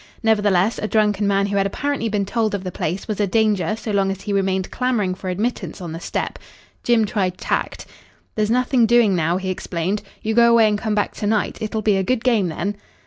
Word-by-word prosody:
Nevertheless, 205 -2 +2
a 215 - -2
drunken 210 -2 +1
man 200 0 +2
who 200 0 -1
had 195 0 +2
apparently 280 +2 -2
been 205 -2 0
told 215 0 0
of 195 - -5
the 185 - -4
place 175 +3 -3
was 215 -2 -3
a 205 - +2
danger 210 -3 +1
so 220 0 -5
long 195 -1 +1
as 195 0 -4
he 205 - -3
remained 190 -1 0
clamouring 240 -7 0
for 185 0 -6
admittance 210 +7 -3
on 175 -3 -6
the 165 - -6
step. - - -4 0.4
Jim 235 -2 +3
tried 190 -4 -1
tact. - - -2 0.5
"There's 215 -1 0
nothing 250 0 +3
doing 235 -4 +4
now," 170 +1 +1
he 190 0 -3
explained. 185 +2 -2 0.2
"You 220 - 0
go 235 +1 +5
away 230 -2 +5
and 210 -1 0
come 215 -1 -1
back 205 - 0
to 205 - -2
night. 215 -1 0
It'll 220 0 -3
be 205 -2 +3
a 190 - +1
good 240 +4 0
game 225 -7 +2
then." 200 +5 -3
205 Hz, 225 wpm, -21 LUFS, 190-220 Hz, 0.5 s, go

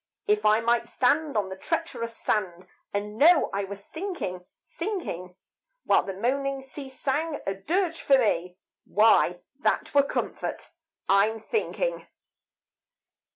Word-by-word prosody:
If 210 0 +2
I 215 +1 +5
might 235 +1 +2
stand 280 +3 +1
on 200 -2 0
the 190 - -5
treacherous 230 - -3
sand, 185 -4 -1 0.3
And 210 +2 -4
know 330 +2 +6
I 200 0 -1
was 200 +1 -9
sinking, 320 - -5 0.2
sinking, 335 - -5 0.5
While - - +4
the 195 - -6
moaning 270 +5 -1
sea 270 +1 -8
sang 290 +4 -2
a 195 - 0
dirge 330 - -1
for 275 - +5
me, 180 -7 0 0.3
Why, 200 -4 +4 0.2
that - - 0
were 285 - +7
comfort, 280 - -4 0.4
I'm 205 +3 +3
thinking. - - -2
230 Hz, 130 wpm, -27 LUFS, 200-295 Hz, 0.5 s, were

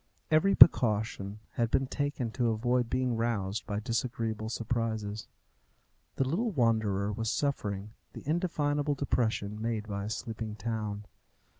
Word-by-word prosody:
Every 180 +6 +4
precaution 105 - +5
had 115 -1 0
been 135 +2 +2
taken 145 -3 -2
to 120 -1 +1
avoid 120 +2 +1
being 125 -2 0
roused 110 -3 -1
by 105 0 -2
disagreeable 115 -2 -2
surprises. 110 -2 -2 0.9
The 135 - +1
little 205 - 0
wanderer 110 - +1
was 115 +1 -2
suffering 105 -8 -2 0.2
the - - -10
indefinable 150 -3 0
depression 110 -6 -1
made 110 -2 -2
by 100 -1 -3
a - - -4
sleeping 110 0 -4
town. 105 -2 -3
115 Hz, 130 wpm, -30 LUFS, 105-130 Hz, 0.9 s, precaution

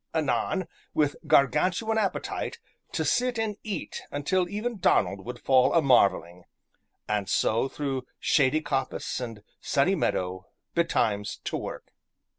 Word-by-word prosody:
Anon, 160 +5 0 0.3
with 145 -2 +2
Gargantuan 185 - +3
appetite, 210 - -2 0.3
to - - -1
sit 250 -1 +1
and 220 -2 -1
eat 215 -3 -5
until 175 +5 0
even 215 +2 -3
Donald 95 - +2
would 125 +3 -6
fall 130 +2 +4
a 165 - +6
marvelling; 95 -8 +3 0.6
and 105 -3 -1
so, 115 +7 +2
through 135 -2 -3
shady 150 +1 +3
coppice 135 -4 -2
and 115 -4 -6 0.2
sunny - - +2
meadow, 95 +1 -1 0.3
betimes 105 -11 0
to - - -3
work. - - -6
140 Hz, 125 wpm, -27 LUFS, 115-185 Hz, 0.6 s, a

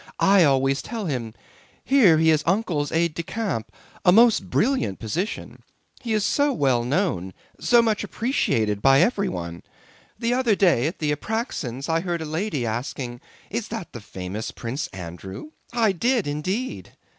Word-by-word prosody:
I 195 -2 +5
always 135 -1 +2
tell 225 -3 -5
him: 120 -8 -3 0.5
Here 225 - +5
he 160 0 +4
is 155 -1 +3
Uncle's 170 -7 0
aide 165 0 +1
de 170 - -3
camp, 170 - -3 0.3
a 180 - +6
most 230 +3 +5
brilliant 250 - +1
position. 170 - -4 0.4
He 230 -2 -2
is 210 -1 +1
so 285 +5 +2
well 130 - +2
known, 125 - -1 0.2
so 240 -1 +4
much 220 -2 0
appreciated 110 - 0
by 135 +3 +6
everyone. 90 - -1 0.6
The 230 +2 0
other 245 -4 +2
day 170 -10 +3
at 165 - -4
the 150 -1 0
Apráksins' 145 - -4
I 165 0 +2
heard 170 -1 -2
a - - -5
lady 155 - -2
asking, 120 +1 -4 0.3
'Is - - -2
that - - -6
the - - -7
famous 95 +4 -6
Prince 125 +5 -4
Andrew?' 95 - -8 0.2
I 230 -3 +2
did 235 +4 +1
indeed." 185 - -3
160 Hz, 155 wpm, -24 LUFS, -, 0.6 s, a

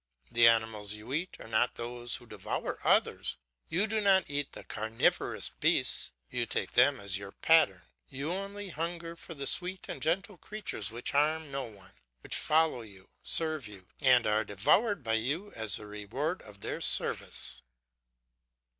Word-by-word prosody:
The 120 0 +6
animals 110 -2 +2
you 110 +5 -8
eat 170 +5 -3
are - - -10
not 115 +2 +1
those 120 +1 -4
who 120 - -9
devour 105 -4 -4
others; - - +2 0.3
you 180 +6 +2
do 220 0 0
not 195 -2 +4
eat 145 -1 -2
the - - -9
carnivorous 110 +1 0
beasts, - - +2 0.2
you - - -1
take - - -2
them 130 +2 +4
as 100 -1 -2
your 100 -1 -8
pattern. 100 - +3 0.3
You 140 +4 -4
only 200 +1 -5
hunger 170 +1 -4
for 165 0 -10
the 140 -1 -5
sweet 185 +5 0
and - - -7
gentle 185 +4 -1
creatures 205 - -5
which 120 +2 -4
harm 155 +1 +1
no 135 -1 -3
one, 100 -5 -14 0.3
which - - -4
follow 155 -5 +2
you, 100 -4 -14
serve 155 -6 +1
you, 95 -3 -13
and 130 -4 +5
are 110 0 +2
devoured 155 - +2
by 115 -1 -1
you 160 - -3
as 110 -3 -1
the 105 - -6
reward 115 - -4
of 105 -2 -14
their - - -4
service. - - +3
130 Hz, 165 wpm, -30 LUFS, 110-165 Hz, 0.3 s, The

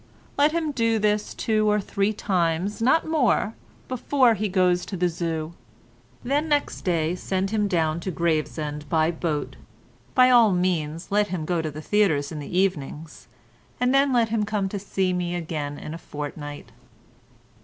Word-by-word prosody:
Let 290 +2 +4
him 320 -2 -1
do 230 -4 +1
this 210 0 0
two 215 -1 +1
or 210 0 +3
three 200 +1 0
times, 185 0 -1
not 260 +8 +3
more, 270 -8 +1 0.3
before 255 -1 +3
he 215 0 -2
goes 180 -1 +2
to 195 - -5
the 180 +1 +2
Zoo. 165 -1 -3 0.7
"Then 290 +5 0
next 290 -1 0
day 165 -2 0
send 190 +1 -2
him 210 -2 +1
down 165 -4 0
to 180 - -4
Gravesend 155 -3 -2
by 160 0 +2
boat. 150 -5 -3 0.6
By 255 0 +6
all 230 -5 +6
means 170 -3 -1
let 205 0 +3
him 180 -4 -4
go 175 0 0
to 155 - -3
the 155 +1 -8
theatres 160 -10 +2
in 155 - -5
the 145 +5 -4
evenings—and 150 - -3
then 275 0 +4
let 235 -3 +3
him 220 -1 0
come 205 -1 -1
to 190 -2 -1
me 175 -1 -2
again 155 -4 -4
in 155 - -7
a 165 - -7
fortnight." 145 -4 -7
185 Hz, 165 wpm, -24 LUFS, 160-215 Hz, 0.7 s, By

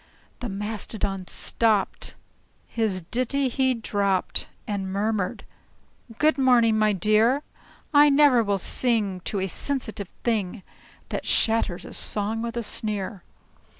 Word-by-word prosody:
The 245 - -4
Mastodon 200 -2 -3
stopped, 220 -4 0 0.5
his 210 -6 -1
ditty 255 +2 +1
he 260 0 +1
dropped, 200 -4 -1 0.2
And 195 -2 -3
murmured, 200 -1 -1 0.7
"Good 305 -2 +3
morning, 240 -4 +5
my 215 -1 +3
dear! 215 - +3 0.5
I 290 0 +7
never 280 -4 +5
will 200 -2 0
sing 210 -2 0
to 205 - -2
a 190 - 0
sensitive 220 - -3
thing 210 -4 -1 0.5
That - - -4
shatters 220 -5 +1
a - - -9
song 215 +2 -2
with 235 +1 -4
a 235 - -1
sneer!" 205 -2 -1
220 Hz, 120 wpm, -25 LUFS, 200-240 Hz, 0.7 s, I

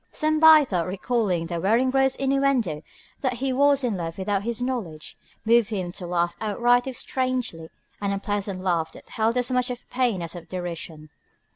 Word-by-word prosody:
Some 310 0 0
by 315 -1 +8
thought 180 -8 -1
recalling 190 -3 -1
the 170 0 -4
Weringrode's 260 +6 +2
innuendo 270 - +1 0.4
that 260 -2 0
he 260 +2 -2
was 280 +1 +3
in 230 -6 0
love 165 -1 -5
without 195 +1 -1
his 235 +2 -3
knowledge, 225 -12 -4 0.3
moved 230 -1 +4
him 185 -5 -3
to 180 -1 -7
laugh 175 0 0
outright 240 +4 +2
if 260 -3 -4
strangely, 255 -11 -2 0.3
an 200 - -1
unpleasant 200 -1 -2
laugh 170 -4 0
that - - -15
held 225 +2 0
as 250 +1 0
much 250 0 +1
of 245 0 -7
pain 240 -8 0
as 170 +1 -6
of 170 -1 -10
derision. 165 -4 -6
220 Hz, 175 wpm, -24 LUFS, 175-255 Hz, 0.4 s, by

